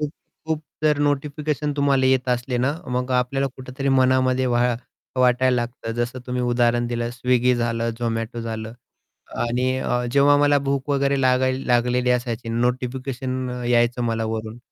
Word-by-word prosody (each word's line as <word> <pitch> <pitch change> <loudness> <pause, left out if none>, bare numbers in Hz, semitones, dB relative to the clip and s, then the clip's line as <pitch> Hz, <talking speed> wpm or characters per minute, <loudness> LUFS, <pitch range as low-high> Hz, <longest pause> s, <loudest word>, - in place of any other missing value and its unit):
खूप 150 -1 -1 0.4
खूप 160 -1 -1 0.2
जर 150 -1 +3
नोटिफिकेशन 145 +1 -1
तुम्हाला 140 -2 +3
येत 130 -1 +2
असले 125 0 0
ना, 130 +4 +1
मग 125 0 -2
आपल्याला 125 +2 +1
कुठेतरी 130 +1 -4
मनामध्ये 130 -1 +3
व्हा 120 0 +2 0.4
वाटायला 125 0 +3
लागतं. 120 -1 -4
जसं 120 +2 -2
तुम्ही 125 0 -2
उदाहरण 120 -1 +2
दिलं 120 0 -2
स्विगी 125 +1 +2
झालं 115 -1 -1
झोमॅटो 115 0 -2
झालं 110 -1 -5 0.8
आणि 125 +2 0
अ, 125 -1 -1
जेव्हा 140 +2 +5
मला 145 0 +4
भूक 140 0 -2
वगैरे 140 -1 +1
लागायला 130 0 +2
लागलेली 125 0 +2
असायची 120 -2 -2
नोटिफिकेशन 125 +2 -2 0.2
यायचं 120 0 +2
मला 115 -1 -1
वरून. 110 0 -4
125 Hz, 145 wpm, -22 LUFS, 120-135 Hz, 0.8 s, जेव्हा